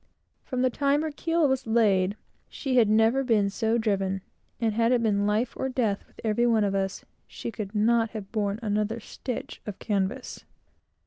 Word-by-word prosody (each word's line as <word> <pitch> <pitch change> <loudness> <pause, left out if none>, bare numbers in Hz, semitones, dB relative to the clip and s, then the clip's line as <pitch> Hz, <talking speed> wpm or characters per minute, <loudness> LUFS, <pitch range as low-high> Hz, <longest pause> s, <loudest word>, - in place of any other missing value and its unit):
From 255 -1 -1
the 255 - +3
time 285 +3 +1
her 315 - -2
keel 330 +1 +1
was 265 -2 -1
laid, 205 -3 +3 0.3
she 270 -3 -2
had 225 -4 +5
never 225 +5 +4
been 210 -5 +2
so 225 +2 +1
driven; 195 -4 0 0.4
and 225 -2 +1
had 230 +2 +2
it 245 -2 +3
been 205 -2 +2
life 215 +4 0
or 265 - -2
death 225 -6 -1
with - - -24
every 230 +2 +2
one 225 -2 +3
of 200 -1 0
us, 195 -1 -2 0.2
she - - -6
could 215 -2 -6
not 225 +2 +3
have 215 -3 -8
borne 205 -2 -1
another 215 +2 0
stitch 245 +2 -6
of 205 -2 -5
canvas. 205 +4 -2
225 Hz, 185 wpm, -27 LUFS, 205-245 Hz, 0.4 s, had